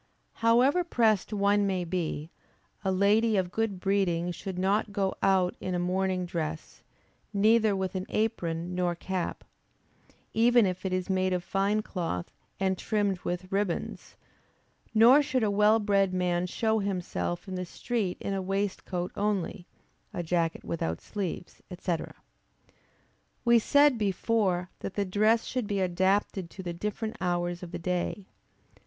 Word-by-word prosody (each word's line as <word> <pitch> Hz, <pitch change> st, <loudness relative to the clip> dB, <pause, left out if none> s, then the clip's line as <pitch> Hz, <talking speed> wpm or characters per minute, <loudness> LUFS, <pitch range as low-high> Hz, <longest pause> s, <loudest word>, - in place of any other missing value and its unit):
However 250 Hz, +9 st, +4 dB
pressed 225 Hz, -, +2 dB
one 205 Hz, 0 st, +2 dB
may 185 Hz, -2 st, 0 dB
be, 165 Hz, -3 st, -3 dB, 0.5 s
a 190 Hz, -, +1 dB
lady 210 Hz, +3 st, +3 dB
of 180 Hz, -2 st, 0 dB
good 220 Hz, -3 st, -1 dB
breeding 180 Hz, -3 st, +1 dB
should 190 Hz, +1 st, -6 dB
not 200 Hz, +3 st, +1 dB
go 195 Hz, -2 st, 0 dB
out 190 Hz, -2 st, +3 dB
in 185 Hz, -1 st, -3 dB
a -, -, +1 dB
morning 185 Hz, +1 st, 0 dB
dress, 160 Hz, -2 st, -5 dB, 0.5 s
neither 215 Hz, +1 st, +4 dB
with 190 Hz, -1 st, -2 dB
an 185 Hz, 0 st, -4 dB
apron 175 Hz, -6 st, -1 dB
nor 180 Hz, -1 st, 0 dB
cap, 185 Hz, 0 st, -3 dB, 0.9 s
even 235 Hz, 0 st, +5 dB
if 185 Hz, 0 st, -2 dB
it -, -, -3 dB
is 185 Hz, -1 st, -1 dB
made 185 Hz, -1 st, +1 dB
of 180 Hz, -1 st, -1 dB
fine 200 Hz, +3 st, 0 dB
cloth 165 Hz, -, -4 dB, 0.3 s
and 190 Hz, -1 st, 0 dB
trimmed 205 Hz, -4 st, 0 dB
with 180 Hz, +1 st, -4 dB
ribbands; 195 Hz, -3 st, -2 dB, 0.8 s
nor 235 Hz, +6 st, +7 dB
should 260 Hz, -4 st, 0 dB
a 210 Hz, -, +2 dB
well 210 Hz, +2 st, +5 dB
bred 200 Hz, -3 st, +2 dB
man 180 Hz, -1 st, 0 dB
show 220 Hz, +4 st, 0 dB
himself 175 Hz, -, -3 dB
in 190 Hz, -, -5 dB
the 180 Hz, 0 st, -2 dB
street 200 Hz, +1 st, -2 dB
in 200 Hz, -, -3 dB
a 195 Hz, -, -1 dB
waistcoat 190 Hz, -2 st, -2 dB
only, 200 Hz, -3 st, -2 dB, 0.5 s
a 175 Hz, -, -2 dB
jacket 165 Hz, -1 st, 0 dB
without 85 Hz, -, -2 dB
sleeves, 190 Hz, -3 st, -5 dB, 0.2 s
&c. 180 Hz, -2 st, 0 dB, 1.5 s
We 235 Hz, 0 st, +6 dB
said 285 Hz, +1 st, +4 dB
before 195 Hz, -3 st, 0 dB
that 195 Hz, -, -6 dB
the 205 Hz, -, 0 dB
dress 215 Hz, +4 st, +2 dB
should 250 Hz, -4 st, -2 dB
be 200 Hz, -1 st, -1 dB
adapted 190 Hz, 0 st, +1 dB
to 190 Hz, -, -9 dB
the 175 Hz, -1 st, -4 dB
different 210 Hz, +5 st, -4 dB
hours 175 Hz, -1 st, -1 dB
of 175 Hz, -2 st, -8 dB
the -, -, -4 dB
day. 180 Hz, +3 st, -2 dB
190 Hz, 150 wpm, -28 LUFS, 180-210 Hz, 1.5 s, nor